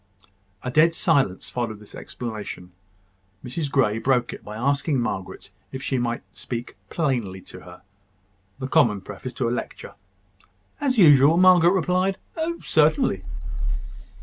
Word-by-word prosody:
A 125 - -3
dead 165 +4 +4
silence 140 - +1
followed 120 -3 -3
this 105 0 -15
explanation. 105 -6 -7 0.7
Mrs 140 +4 -3
Grey 120 -6 +2
broke 125 -1 +1
it - - -10
by 105 - -8
asking 140 +3 +1
Margaret 95 -6 -4 0.2
if 130 0 -6
she 130 - 0
might 120 -1 -2
speak 120 0 -6
plainly 120 - -1
to 90 - -12
her 90 0 -14 0.7
the 130 -1 -4
common 120 -10 +3
preface 125 +6 -8
to 120 0 -1
a - - 0
lecture. - - -6 0.9
As 265 -3 0
usual, 150 -4 +7
Margaret 180 -1 +6
replied, 185 0 +1 0.2
"Oh! 335 +1 -2
certainly." - - +2
130 Hz, 135 wpm, -24 LUFS, 115-165 Hz, 0.9 s, usual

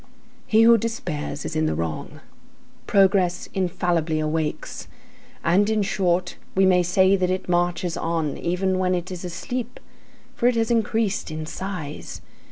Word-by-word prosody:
He 220 +1 +5
who 230 0 +7
despairs 155 -10 -4
is 165 - -4
in 155 0 +1
the - - 0
wrong. 80 -2 -4 0.7
Progress 190 -3 +3
infallibly 175 -4 0
awakes, 155 0 -3 0.6
and, 190 +5 +3
in 215 -1 +2
short, 185 -2 0 0.2
we 190 0 +4
may 180 -1 +5
say 190 +2 +4
that 185 -2 0
it 185 0 -2
marches 175 0 0
on, 165 -3 -1
even 185 +2 0
when 185 0 +2
it 175 +1 -4
is 180 -1 -6
asleep, 240 +8 -5 0.5
for 240 - +1
it 250 - +3
has 225 0 +1
increased 220 -4 0
in 155 0 -5
size. 165 -4 -6
180 Hz, 150 wpm, -23 LUFS, 170-195 Hz, 0.7 s, who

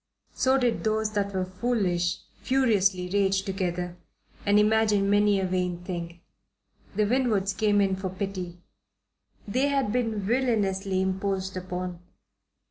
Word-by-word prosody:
So 265 +1 +3
did 245 -3 0
those 220 -1 0
that 200 -1 -1
were 190 -1 -1
foolish 185 -4 -1 0.2
furiously 205 -8 +2
rage 195 -1 +2
together 180 -2 -3 0.5
and 205 +1 +5
imagine 210 -2 +3
many 205 -1 +4
a 190 - 0
vain 180 -1 -1
thing. 170 -1 -6 0.7
The 210 +1 +2
Winwoods 215 -5 +1
came 210 -2 +2
in 195 -1 +2
for 190 0 -4
pity. 185 -2 -5 0.9
They 255 +7 +1
had 275 -6 +1
been 225 -3 0
villainously 200 -4 0
imposed 190 0 -2
upon. 180 -1 -4
195 Hz, 125 wpm, -27 LUFS, 185-215 Hz, 0.9 s, and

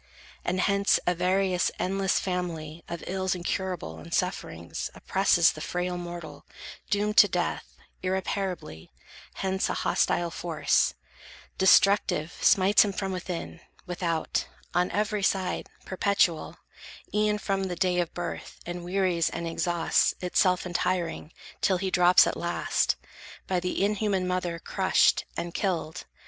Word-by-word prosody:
And 185 +1 0
hence, 200 0 +3
a 180 - +3
various, 185 +1 +1
endless 195 0 +1
family 170 -3 -4
Of 170 -1 -5
ills 190 0 -1
incurable 180 - -3
and 85 +1 -12
sufferings 85 +1 -3
Oppresses 190 -3 +3
the 155 - -9
frail 180 +2 -2
mortal, 175 -2 -7 0.5
doomed 210 +1 0
to - - +9
death - - -3 0.2
Irreparably; 185 - -3 0.5
hence 190 0 -1
a - - -1
hostile 170 -1 +1
force, 165 -2 +1 0.6
Destructive, 190 -4 +4
smites 195 +1 +5
him 205 -2 -2
from 195 0 -3
within, 180 -2 -5 0.3
without, 175 -2 -2 0.3
On 180 +1 +2
every 210 0 -1
side, 190 -2 0 0.2
perpetual, 190 -4 +1 0.6
e'en 210 0 +2
from 195 -2 -1
The 180 -2 -3
day 180 0 +1
of 175 -1 -1
birth, 175 -1 -6
and 175 0 -5
wearies 180 -2 +1
and 170 - -4
exhausts, 170 0 +1
Itself 180 0 +2
untiring, 175 -2 -2 0.3
till 190 - +3
he 190 +1 -2
drops 180 0 +6
at - - -1
last, - - 0 0.5
By 185 -1 0
the 180 +2 0
inhuman 205 -3 0
mother 180 -2 -1
crushed, 190 +2 +2
and 170 0 -4
killed. 175 -4 -2
180 Hz, 130 wpm, -27 LUFS, 175-190 Hz, 0.6 s, to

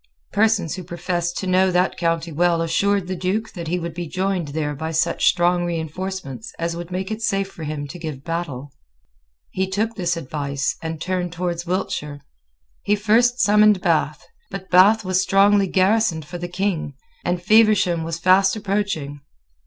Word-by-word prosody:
Persons 210 -6 +2
who 185 - -6
professed 175 0 -3
to - - -3
know 185 +1 +3
that 180 +1 +1
county 165 -1 -1
well 170 +1 +2
assured 200 +4 +1
the 185 +1 -4
Duke 185 +5 -2
that 170 -4 -6
he 175 +3 0
would 170 -2 -5
be 175 0 -5
joined 185 -1 -1
there 150 0 -2
by 160 +3 -4
such 165 +1 +1
strong 175 0 +3
reinforcements 165 - -5
as 170 0 -2
would 170 0 -7
make 190 +2 -4
it 215 +1 -4
safe 195 -3 0
for 160 - -8
him 150 -1 -4
to 175 - -8
give 155 -5 -6
battle. 145 -5 -4 0.8
He 190 0 -1
took 215 +4 -1
this 175 -5 -1
advice, 140 -2 -3
and 160 -1 -5
turned 180 0 -2
towards 175 -1 -3
Wiltshire. 150 -6 -3 0.6
He 205 - +2
first 230 +4 +3
summoned 210 -2 +5
Bath. - - 0 0.2
But 190 -1 -8
Bath 200 +4 +6
was 185 0 +2
strongly 195 +1 +4
garrisoned 185 -4 +2
for 175 +3 -7
the 175 - -4
King; 180 -6 -2 0.3
and 175 0 -1
Feversham 205 -3 +4
was 165 0 -3
fast 185 +3 +4
approaching. 195 -9 -2
180 Hz, 170 wpm, -21 LUFS, 165-195 Hz, 0.8 s, Bath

